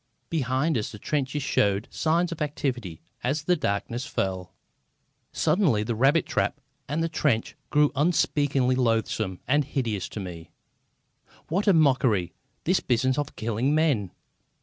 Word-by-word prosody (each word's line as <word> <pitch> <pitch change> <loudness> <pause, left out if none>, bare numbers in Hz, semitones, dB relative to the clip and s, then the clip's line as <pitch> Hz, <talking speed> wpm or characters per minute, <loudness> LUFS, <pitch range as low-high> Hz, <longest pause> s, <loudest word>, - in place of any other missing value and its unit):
Behind 135 -1 +1
us 105 - -4
the 105 - -9
trenches 140 +4 -2
showed 100 -3 +1
signs 170 +2 +1
of 165 - -6
activity 125 - -3 0.2
as 140 +5 0
the 180 +3 +3
darkness 115 -2 -2
fell. 95 -9 -3 0.8
Suddenly 155 - +2
the 115 +2 -2
rabbit 135 +8 +3
trap - - -1 0.3
and 155 +3 0
the - - +1
trench 145 -8 0
grew 150 -1 +3
unspeakably 145 -4 +2
loathsome 110 -6 0
and 145 +3 +3
hideous 120 -9 -2
to - - -6
me. 85 -4 -7 1.0
What 195 +6 0
a 200 - +7
mockery, 130 - +3 0.3
this 185 +3 +2
business 130 +2 +1
of 145 0 -4
killing 115 +6 0
men! 140 - +2
130 Hz, 140 wpm, -26 LUFS, 110-150 Hz, 1.0 s, a